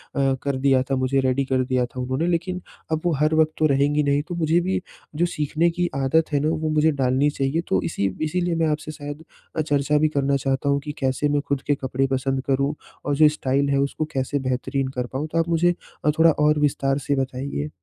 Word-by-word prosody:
अ, 135 Hz, -1 st, +2 dB
कर 140 Hz, -1 st, -1 dB
दिया 130 Hz, -1 st, +3 dB
था -, -, +3 dB
मुझे 130 Hz, +1 st, +1 dB
रेडी 130 Hz, +1 st, +1 dB
कर 130 Hz, -1 st, +1 dB
दिया 125 Hz, -1 st, +2 dB
था 125 Hz, +1 st, -9 dB
उन्होंने 130 Hz, +5 st, -1 dB
लेकिन 180 Hz, +1 st, -1 dB, 0.3 s
अब 160 Hz, 0 st, 0 dB
वो 170 Hz, -, +2 dB
हर 155 Hz, +3 st, +1 dB
वक़्त 155 Hz, 0 st, +3 dB
तो 155 Hz, -, +2 dB
रहेंगी 145 Hz, +2 st, +2 dB
नहीं 140 Hz, 0 st, +2 dB
तो 175 Hz, -, -4 dB
मुझे 165 Hz, +1 st, +2 dB
भी 185 Hz, +1 st, -1 dB, 0.3 s
जो 170 Hz, -, +2 dB
सीखने 160 Hz, 0 st, 0 dB
की 175 Hz, 0 st, +1 dB
आदत 140 Hz, +4 st, +1 dB
है 145 Hz, -, +3 dB
ना -, -, +3 dB
वो 155 Hz, -1 st, -1 dB
मुझे 155 Hz, +1 st, +3 dB
डालनी 135 Hz, +1 st, +2 dB
चाहिए। 140 Hz, +3 st, -1 dB
तो -, -, +1 dB
इसी 100 Hz, -11 st, -1 dB, 0.2 s
इसीलिए 175 Hz, +2 st, 0 dB
मैं 165 Hz, -1 st, +1 dB
आपसे 155 Hz, 0 st, -2 dB
शायद 145 Hz, +1 st, -8 dB, 0.3 s
अ, -, -, +3 dB
चर्चा 145 Hz, -1 st, +1 dB
भी 155 Hz, +1 st, +3 dB
करना 140 Hz, 0 st, +2 dB
चाहता 135 Hz, +1 st, -1 dB
हूँ 140 Hz, 0 st, +2 dB
कि 150 Hz, -, -3 dB
कैसे 135 Hz, +2 st, 0 dB
मैं 145 Hz, 0 st, +1 dB
ख़ुद 140 Hz, -1 st, 0 dB
के 145 Hz, -, +3 dB
कपड़े 135 Hz, 0 st, -1 dB
पसंद 135 Hz, 0 st, 0 dB
करूँ 140 Hz, +2 st, +1 dB, 0.3 s
और 145 Hz, -1 st, +1 dB
जो 155 Hz, +1 st, +6 dB
स्टाइल 140 Hz, -1 st, 0 dB
है 140 Hz, 0 st, +2 dB
उसको 140 Hz, +3 st, -1 dB
कैसे 135 Hz, +2 st, -1 dB
बेहतरीन 130 Hz, +1 st, -1 dB
कर 125 Hz, -, 0 dB
पाऊँ 145 Hz, +4 st, -2 dB
तो 165 Hz, -, -1 dB
आप 165 Hz, +1 st, 0 dB
मुझे 175 Hz, +1 st, +3 dB, 0.3 s
अ, 150 Hz, -, +5 dB
थोड़ा 165 Hz, 0 st, +7 dB
और 150 Hz, 0 st, +2 dB
विस्तार 135 Hz, -1 st, +1 dB
से 140 Hz, -, +2 dB
बताइए। 130 Hz, -, -3 dB
145 Hz, 230 wpm, -23 LUFS, 135-155 Hz, 0.3 s, थोड़ा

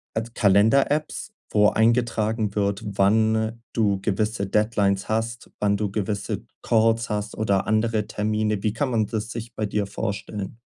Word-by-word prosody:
äh, 110 Hz, -, 0 dB
Kalender-Apps, 135 Hz, -, +2 dB, 0.2 s
wo 105 Hz, -1 st, +4 dB
eingetragen 110 Hz, -2 st, +1 dB
wird, 100 Hz, +1 st, 0 dB
wann 110 Hz, +3 st, +1 dB
du 100 Hz, -4 st, +1 dB
gewisse 105 Hz, 0 st, -1 dB
Deadlines 100 Hz, -2 st, +1 dB
hast, 115 Hz, +2 st, -2 dB
wann 100 Hz, -1 st, +2 dB
du 105 Hz, -1 st, -2 dB
gewisse 100 Hz, 0 st, -3 dB, 0.2 s
Calls 115 Hz, 0 st, +2 dB
hast 105 Hz, 0 st, -3 dB
oder 100 Hz, -3 st, +1 dB
andere 110 Hz, -1 st, +1 dB
Termine. 105 Hz, -1 st, -1 dB
Wie 105 Hz, -, +1 dB
kann 130 Hz, +3 st, -1 dB
man 110 Hz, -3 st, +2 dB
das 110 Hz, +1 st, -4 dB
sich 115 Hz, 0 st, -6 dB
bei 110 Hz, -, -1 dB
dir 105 Hz, 0 st, -1 dB
vorstellen? 100 Hz, +1 st, -5 dB
110 Hz, 145 wpm, -24 LUFS, 100-115 Hz, 0.2 s, wo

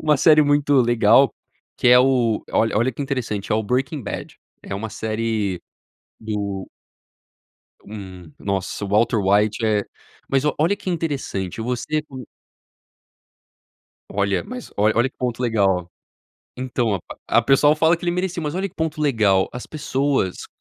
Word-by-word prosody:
uma 150 Hz, -2 st, +3 dB
série 155 Hz, +2 st, +6 dB
muito 145 Hz, 0 st, +2 dB
legal, 120 Hz, +2 st, +4 dB, 0.4 s
que -, -, -1 dB
é 125 Hz, 0 st, +8 dB
o 125 Hz, -4 st, +2 dB
olha 110 Hz, -1 st, +1 dB
olha 120 Hz, +4 st, +2 dB
que 120 Hz, -, -9 dB
interessante, 115 Hz, -8 st, -3 dB
é -, -, +3 dB
o 110 Hz, -, +1 dB
Breaking 130 Hz, +6 st, -1 dB
Bad. 100 Hz, -, -6 dB, 0.3 s
É -, -, -5 dB
uma 105 Hz, +2 st, -5 dB
série 110 Hz, -4 st, -2 dB, 0.6 s
do 100 Hz, -3 st, -4 dB, 1.2 s
hum, 95 Hz, -5 st, -10 dB
nossa, 100 Hz, 0 st, -3 dB
o -, -, -5 dB
Walter 110 Hz, +3 st, +2 dB
White, 105 Hz, +3 st, +2 dB
é 105 Hz, -2 st, +2 dB, 0.5 s
Mas 135 Hz, +1 st, +1 dB
o 150 Hz, -, +2 dB
olha 170 Hz, +6 st, +3 dB
que 205 Hz, -2 st, -6 dB
interessante. 140 Hz, -, -3 dB
Você 125 Hz, +6 st, -2 dB
co 130 Hz, -4 st, -9 dB, 1.9 s
Olha, 100 Hz, -1 st, 0 dB
mas 250 Hz, -1 st, -8 dB
olha 105 Hz, +2 st, +3 dB
olha 120 Hz, +3 st, +3 dB
que -, -, -38 dB
ponto 125 Hz, -1 st, -2 dB
legal. 100 Hz, -7 st, +1 dB, 0.7 s
Então, 125 Hz, -5 st, -1 dB, 0.3 s
a -, -, +5 dB
pessoal 140 Hz, +4 st, +4 dB
fala 160 Hz, +2 st, +3 dB
que 170 Hz, -, -10 dB
ele 175 Hz, -, +1 dB
merecia, 180 Hz, -1 st, -2 dB
mas 150 Hz, +1 st, -3 dB
olha 195 Hz, +2 st, -1 dB
que -, -, -24 dB
ponto 160 Hz, -1 st, -3 dB
legal. 110 Hz, -10 st, +2 dB
As 125 Hz, -, -7 dB
pessoas 140 Hz, -, -1 dB
120 Hz, 155 wpm, -22 LUFS, 105-145 Hz, 1.9 s, é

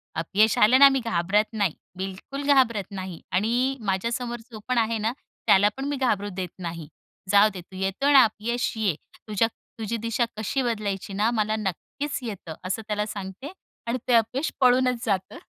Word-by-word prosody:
अपयश 200 Hz, +7 st, +2 dB
आलं 250 Hz, +5 st, +6 dB
ना, 280 Hz, 0 st, +10 dB
मी 270 Hz, -1 st, +1 dB
घाबरत 200 Hz, +2 st, +2 dB
नाही, 200 Hz, -7 st, +1 dB, 0.2 s
बिलकूल 195 Hz, +9 st, -5 dB
घाबरत 230 Hz, -8 st, +2 dB
नाही 185 Hz, -3 st, -6 dB
आणि 240 Hz, +8 st, +1 dB
माझ्यासमोर 235 Hz, +5 st, -1 dB
जो 215 Hz, -, -8 dB
पण 255 Hz, -1 st, 0 dB
आहे 225 Hz, 0 st, +2 dB
ना, 220 Hz, +2 st, 0 dB, 0.4 s
त्याला 205 Hz, +2 st, +6 dB
पण 270 Hz, -, -3 dB
मी 290 Hz, -, -1 dB
घाबरू 210 Hz, -6 st, 0 dB
देत 185 Hz, -2 st, -3 dB
नाही. 165 Hz, -3 st, -6 dB, 0.4 s
जाऊ 205 Hz, +1 st, +6 dB
दे, 185 Hz, -, -7 dB
तू 185 Hz, -, -16 dB
येतो 195 Hz, +10 st, 0 dB
ना 270 Hz, -3 st, +9 dB
अपयश 230 Hz, +2 st, -1 dB
ये, 200 Hz, -8 st, +1 dB, 0.3 s
तुझ्या 215 Hz, +1 st, +2 dB, 0.3 s
तुझी 225 Hz, +1 st, -2 dB
दिशा 230 Hz, +2 st, 0 dB
कशी 220 Hz, +6 st, -1 dB
बदलायची 205 Hz, -5 st, -2 dB
ना, 210 Hz, +3 st, +2 dB
मला 215 Hz, -1 st, +1 dB
नक्कीच 220 Hz, -, -4 dB
येतं, 195 Hz, -7 st, -6 dB
असं 190 Hz, +4 st, -2 dB
त्याला 210 Hz, 0 st, -1 dB
सांगते 200 Hz, -, -7 dB, 0.4 s
आणि 240 Hz, +2 st, 0 dB
ते 250 Hz, -, +3 dB
अपयश 250 Hz, +6 st, +1 dB
पळूनच 250 Hz, -1 st, +3 dB
जातं. 195 Hz, -4 st, -1 dB
215 Hz, 175 wpm, -25 LUFS, 195-245 Hz, 0.4 s, ना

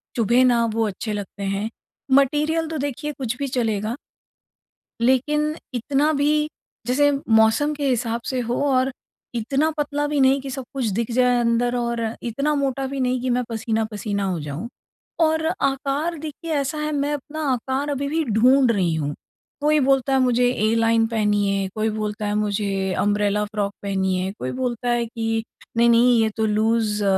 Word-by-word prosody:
चुभें 235 Hz, +2 st, +3 dB
ना 240 Hz, -2 st, +3 dB
वो 225 Hz, 0 st, +1 dB
अच्छे 210 Hz, +2 st, -4 dB
लगते 200 Hz, -1 st, -6 dB
हैं, 200 Hz, +2 st, -2 dB, 0.4 s
मटीरियल 300 Hz, +4 st, +3 dB
तो 320 Hz, -, -3 dB
देखिए 290 Hz, +1 st, -3 dB
कुछ 245 Hz, -2 st, -2 dB
भी 280 Hz, -, -2 dB
चलेगा 225 Hz, -3 st, -1 dB, 1.0 s
लेकिन 295 Hz, +5 st, +2 dB, 0.2 s
इतना 275 Hz, +5 st, +1 dB
भी 300 Hz, +1 st, +1 dB, 0.4 s
जैसे 290 Hz, +4 st, +3 dB, 0.2 s
मौसम 220 Hz, +7 st, +4 dB
के 290 Hz, -1 st, -2 dB
हिसाब 235 Hz, -2 st, -1 dB
से 260 Hz, -, -1 dB
हो 240 Hz, 0 st, -1 dB
और 265 Hz, -1 st, +2 dB, 0.4 s
इतना 275 Hz, +7 st, +1 dB
पतला 290 Hz, 0 st, -1 dB
भी 290 Hz, -1 st, 0 dB
नहीं 265 Hz, +1 st, +4 dB
कि 270 Hz, -, -6 dB
सब 265 Hz, 0 st, -5 dB
कुछ 270 Hz, -3 st, -2 dB
दिख 220 Hz, +3 st, -1 dB
जाए 250 Hz, 0 st, +3 dB
अंदर, 240 Hz, +1 st, +1 dB
और 235 Hz, -2 st, -2 dB
इतना 275 Hz, +6 st, -1 dB
मोटा 275 Hz, -1 st, -1 dB
भी 275 Hz, +1 st, -4 dB
नहीं 255 Hz, -1 st, 0 dB
कि 255 Hz, -, -2 dB
मैं 250 Hz, 0 st, +1 dB
पसीना-पसीना 220 Hz, -2 st, -2 dB
हो 185 Hz, -3 st, -1 dB
जाऊँ। 150 Hz, +8 st, -5 dB, 0.5 s
और 320 Hz, 0 st, +2 dB, 0.2 s
आकार 280 Hz, +5 st, 0 dB
देखिए 315 Hz, +2 st, -5 dB
ऐसा 290 Hz, +1 st, -1 dB
है 300 Hz, 0 st, -2 dB
मैं 290 Hz, 0 st, 0 dB
अपना 295 Hz, +2 st, -5 dB
आकार 265 Hz, +4 st, -2 dB
अभी 280 Hz, 0 st, -2 dB
भी 320 Hz, +3 st, 0 dB
ढूँढ 250 Hz, +3 st, +4 dB
रही 185 Hz, -6 st, +1 dB
हूँ। 145 Hz, -2 st, -2 dB, 0.5 s
कोई 300 Hz, +1 st, +3 dB
बोलता 270 Hz, -1 st, +2 dB
है 265 Hz, -, +4 dB
मुझे 250 Hz, -1 st, +3 dB
एलाइन 225 Hz, 0 st, +2 dB
पहनिए, 205 Hz, -3 st, +1 dB
कोई 220 Hz, 0 st, 0 dB
बोलता 215 Hz, 0 st, -3 dB
है 205 Hz, -, -1 dB
मुझे 200 Hz, -2 st, -1 dB
अम्ब्रेला 205 Hz, 0 st, +1 dB
फ्रॉक 205 Hz, -1 st, -3 dB
पहनिए, 190 Hz, -1 st, 0 dB
कोई 130 Hz, -, -3 dB
बोलता 245 Hz, -1 st, -2 dB
है 240 Hz, -1 st, +1 dB
कि 225 Hz, -1 st, -2 dB, 0.3 s
नहीं-नहीं 235 Hz, +1 st, +5 dB
ये 220 Hz, -, +2 dB
तो 220 Hz, -, +1 dB
लूज़ 215 Hz, 0 st, +1 dB
240 Hz, 170 wpm, -22 LUFS, 215-275 Hz, 1.0 s, नहीं-नहीं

